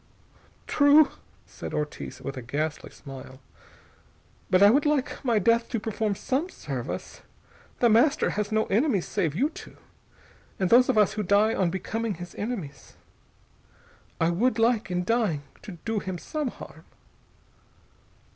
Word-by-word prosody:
"True," 290 Hz, +1 st, +5 dB, 0.3 s
said -, -, -7 dB
Ortiz 150 Hz, 0 st, -5 dB
with 135 Hz, -, -5 dB
a 130 Hz, -, -6 dB
ghastly 150 Hz, +5 st, -3 dB
smile. 130 Hz, -1 st, -11 dB, 1.1 s
"But 185 Hz, +1 st, +5 dB
I 205 Hz, -, +8 dB
would 285 Hz, +4 st, +3 dB
like 295 Hz, -2 st, -1 dB
my 235 Hz, -4 st, +2 dB
death 230 Hz, +3 st, +2 dB
to 230 Hz, -, -1 dB
perform 215 Hz, -1 st, -2 dB
some 275 Hz, -, -2 dB
service. -, -, -6 dB, 0.6 s
The 240 Hz, -, +6 dB
Master 240 Hz, +7 st, +3 dB
has 210 Hz, 0 st, -2 dB
no 220 Hz, 0 st, +2 dB
enemies 210 Hz, -, +1 dB
save 165 Hz, -8 st, -1 dB
you 280 Hz, -, +1 dB
two, -, -, -12 dB, 0.8 s
and 190 Hz, -2 st, -1 dB
those 250 Hz, +2 st, +6 dB
of -, -, +2 dB
us 210 Hz, -3 st, +4 dB
who 215 Hz, -, -2 dB
die 205 Hz, +3 st, +3 dB
on 185 Hz, -3 st, +1 dB
becoming 215 Hz, +4 st, -3 dB
his 175 Hz, +1 st, -9 dB
enemies. 205 Hz, -, -6 dB, 1.2 s
I 165 Hz, +1 st, +2 dB
would 230 Hz, +7 st, +1 dB
like, 225 Hz, -3 st, +2 dB
in 180 Hz, 0 st, -1 dB
dying, 210 Hz, -10 st, 0 dB, 0.2 s
to 200 Hz, -, -9 dB
do 225 Hz, -2 st, 0 dB
him 185 Hz, -2 st, -5 dB
some 300 Hz, -, -4 dB
harm." -, -, -10 dB
215 Hz, 145 wpm, -26 LUFS, 180-240 Hz, 1.2 s, I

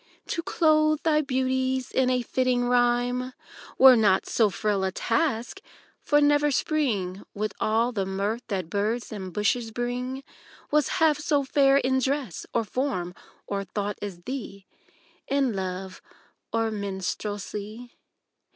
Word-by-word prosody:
To 335 Hz, -, -1 dB
clothe 310 Hz, -4 st, +3 dB
thy 305 Hz, -2 st, +3 dB
beauties 260 Hz, -1 st, -1 dB
in 260 Hz, -1 st, +2 dB
a 250 Hz, -1 st, +1 dB
fitting 250 Hz, 0 st, +1 dB
rhyme 245 Hz, +1 st, +1 dB, 0.4 s
Were 260 Hz, -1 st, +9 dB
not 200 Hz, -4 st, +3 dB
so 220 Hz, -3 st, +2 dB
frail 200 Hz, +1 st, -1 dB
a 190 Hz, -, 0 dB
task: 240 Hz, -, -1 dB, 0.4 s
for 295 Hz, -, +3 dB
never 290 Hz, 0 st, +4 dB
spring 225 Hz, -, -1 dB
With 215 Hz, +1 st, -2 dB
all 225 Hz, +3 st, +1 dB
the 195 Hz, -5 st, -2 dB
mirth 200 Hz, +4 st, -2 dB
that 190 Hz, -5 st, -3 dB
birds 215 Hz, +7 st, -2 dB
and 190 Hz, -4 st, -6 dB
bushes 225 Hz, +4 st, 0 dB
bring 250 Hz, +3 st, -3 dB, 0.5 s
Was 300 Hz, -1 st, +3 dB
half 315 Hz, -2 st, +3 dB
so 295 Hz, -1 st, +1 dB
fair 275 Hz, 0 st, +4 dB
in 260 Hz, -1 st, +2 dB
dress, 265 Hz, -, -2 dB
or 230 Hz, -, +1 dB
form, 215 Hz, -7 st, -2 dB, 0.3 s
or 200 Hz, -1 st, -3 dB
tho't 205 Hz, +1 st, -4 dB
as 190 Hz, -4 st, -6 dB
thee: 205 Hz, -4 st, -6 dB, 0.6 s
In 275 Hz, -4 st, +1 dB
love 185 Hz, 0 st, -5 dB, 0.5 s
or 225 Hz, -1 st, 0 dB
minstrelsy. 205 Hz, +3 st, -5 dB
240 Hz, 135 wpm, -26 LUFS, 205-265 Hz, 0.6 s, Were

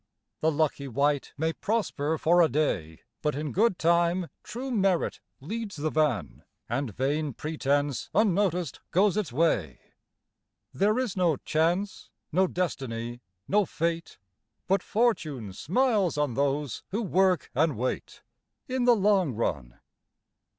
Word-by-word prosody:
The 160 Hz, -, +2 dB
lucky 145 Hz, -2 st, 0 dB
wight 140 Hz, +2 st, 0 dB
may 160 Hz, +2 st, 0 dB
prosper 160 Hz, -9 st, -1 dB
for 175 Hz, +3 st, +4 dB
a 165 Hz, -, +5 dB
day, 100 Hz, -, -1 dB, 0.2 s
But 150 Hz, -2 st, 0 dB
in 150 Hz, 0 st, -3 dB
good 210 Hz, -1 st, +2 dB
time 170 Hz, +1 st, +2 dB
true 260 Hz, +4 st, -6 dB
merit 195 Hz, -6 st, +1 dB, 0.2 s
leads 210 Hz, +6 st, -5 dB
the 155 Hz, +1 st, -2 dB
van 135 Hz, -, 0 dB, 0.2 s
And 125 Hz, +1 st, -2 dB
vain 140 Hz, +1 st, -1 dB
pretence, 145 Hz, -4 st, -1 dB
unnoticed, 185 Hz, -6 st, +1 dB
goes 195 Hz, +2 st, +3 dB
its 210 Hz, -, -1 dB
way. 120 Hz, -, +1 dB, 1.0 s
There 205 Hz, -, +2 dB
is 255 Hz, -6 st, -1 dB
no 175 Hz, -6 st, +2 dB
Chance, 175 Hz, +5 st, -1 dB, 0.2 s
no 185 Hz, +4 st, +3 dB
Destiny, 120 Hz, -10 st, -3 dB, 0.3 s
no 210 Hz, +1 st, +3 dB
Fate, 170 Hz, -1 st, -3 dB, 0.5 s
But 195 Hz, 0 st, +2 dB
Fortune 155 Hz, -, 0 dB
smiles 200 Hz, -, +1 dB
on 145 Hz, -4 st, 0 dB
those 140 Hz, -1 st, -1 dB
who 220 Hz, +4 st, -2 dB
work 185 Hz, -2 st, +2 dB
and 150 Hz, -1 st, +2 dB
wait, 125 Hz, +3 st, -3 dB, 0.4 s
In 255 Hz, -2 st, 0 dB
the 245 Hz, -1 st, +6 dB
long 195 Hz, -, +2 dB
run. -, -, -2 dB
160 Hz, 130 wpm, -28 LUFS, 140-195 Hz, 1.0 s, the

